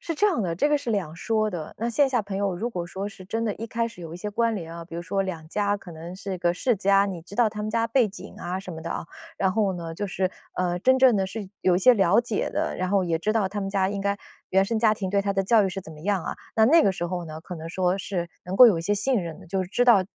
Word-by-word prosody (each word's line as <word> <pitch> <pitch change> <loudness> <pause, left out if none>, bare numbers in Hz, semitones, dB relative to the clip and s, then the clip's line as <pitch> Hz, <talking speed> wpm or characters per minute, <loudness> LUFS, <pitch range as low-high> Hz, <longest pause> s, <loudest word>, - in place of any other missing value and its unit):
是 330 - -4
这 415 +7 +3
样 360 - +1
的， 170 -2 -1
这 290 - +2
个 295 -1 +3
是 240 - -4
两 180 -7 -1
说 215 +2 0
的。 165 -5 -6
那 235 +2 -2
线 280 +3 +3
下 245 -4 +1
朋 200 -1 -5
友 195 -3 0
如 235 +6 -2
果 175 -4 -4
说 195 +3 -5
是 190 -2 -12
真 225 +4 -2
的 210 - -1
一 230 - -5
开 230 +1 -1
始 225 -5 -14
有 165 -1 -7
一 - - -6
些 210 +3 -5
关 230 +1 +1
联 165 -2 -6
啊， 170 0 -7
比 165 - -11
如 170 - -4
说 195 +3 -1
两 165 -5 -5
家 205 +2 0
可 180 -4 -11
能 170 +3 -8
是 195 -1 -5
个 175 0 +1
世 245 +5 +1
家， 195 +1 +4
你 185 -4 -4
知 180 +4 -12
道 235 -3 +4
他 210 0 -6
们 215 - -2
家 230 0 +1
背 230 -1 +3
景 195 - -10
啊 180 +2 -3
什 185 -2 -8
么 160 - -7
的， 165 - -6
啊， - - -3 0.3
然 190 -1 +1
后 205 -3 +1
呢 165 -2 -6
就 205 +3 -3
是， 185 0 -1 0.2
呃， 180 -1 0
真 260 +7 +4
正 255 -4 +6
的 190 -1 +1
是 200 -1 -6
有 180 -1 +3
一 - - +2
些 250 +6 +7
了 200 +1 +4
解 230 -4 -2
的， - - -2
然 185 - -1
后 195 -1 +2
也 165 -2 0
知 215 +6 0
道 210 -4 +1
他 205 +1 -4
们 195 - -2
家 195 -1 +1
应 200 - -3
该 200 0 0 0.3
原 190 +1 +3
生 225 +2 -1
家 220 -1 +4
庭 190 -3 -4
对 200 0 +2
他 200 0 -1
的 195 0 +1
教 215 +2 +4
育 - - +1
是 195 +1 -4
怎 160 -3 -11
么 150 - -12
样 195 +1 0
啊， - - -4 0.2
那 220 - +6
那 320 +6 +6
个 195 - +3
时 175 -1 -3
候 175 0 -3
呢， 155 0 -7
可 180 -1 -7
能 160 +1 -7
说 185 +2 0
是 175 -3 -3
能 185 +2 -4
够 250 - +11
有 190 -7 +4
一 - - -4
些 205 +4 +1
信 230 +2 +1
任 165 -2 -6
的， - - -14
就 190 0 0
是 - - -11
知 245 +5 +2
道 205 -6 +6
195 Hz, 345 characters per minute, -25 LUFS, 180-220 Hz, 0.3 s, 够